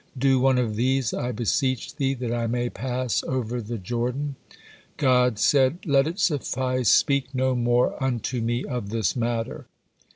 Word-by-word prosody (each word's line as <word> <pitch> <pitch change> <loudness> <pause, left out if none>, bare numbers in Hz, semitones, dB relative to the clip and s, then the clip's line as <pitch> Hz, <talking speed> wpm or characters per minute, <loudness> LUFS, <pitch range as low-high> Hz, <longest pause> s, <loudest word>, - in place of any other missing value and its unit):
Do 135 0 +3
one 130 0 +3
of 115 -4 -1
these, 130 -1 +1
I 125 - -2
beseech 125 +2 -1
Thee, 135 -1 0
that 120 -2 -3
I 120 -1 -1
may 120 +1 -1
pass 125 +1 -2
over 125 -2 -2
the 115 +2 -5
Jordan." 125 +7 -3 0.6
God 125 -4 +3
said: 135 +6 +3
"'Let 140 -2 +3
it 170 +3 -4
suffice, 130 -7 0
speak 140 -2 +2
no 130 0 +1
more 120 +1 +1
unto 125 -1 -1
Me 120 +2 -1
of 125 -7 -4
this 110 -3 0
matter.' 115 -2 -3
125 Hz, 160 wpm, -25 LUFS, 120-130 Hz, 0.6 s, Do